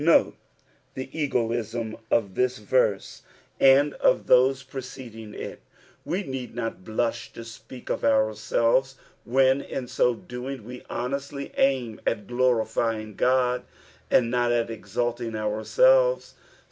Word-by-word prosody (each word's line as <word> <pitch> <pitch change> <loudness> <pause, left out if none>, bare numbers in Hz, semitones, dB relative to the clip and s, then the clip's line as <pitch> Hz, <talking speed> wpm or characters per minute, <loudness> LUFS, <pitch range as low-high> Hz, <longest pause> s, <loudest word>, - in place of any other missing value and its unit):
Note 165 +1 +4 0.6
Ibe 130 0 -5
egoism 115 -6 -1
of 100 -5 +1
this 125 +4 +1
verse 105 -2 0 0.4
and 140 +2 +6
of - - +2
those 130 +1 +4
preceding 125 -5 -9
it; - - -7 0.4
we 190 +4 -2
need 130 -5 -6
not 115 -5 -4
blush 115 +3 -2
to 115 - -8
speak 120 +2 -9
of - - -2
ourselves 115 +4 +2 0.3
when, 130 +2 +3
in 130 -2 -5
ao 125 - +5
doing 125 0 -7
ne 125 0 -7
boueatly 140 +2 -4
aim 130 -5 +1
at 105 -3 0
glorifyini^ 115 -3 0
God, 125 +1 +2 0.5
and 120 -2 +3
not 120 -1 +2
at 115 -1 0
exalting 115 +2 -3
ouiselves. - - +3
120 Hz, 120 wpm, -26 LUFS, 115-130 Hz, 0.6 s, and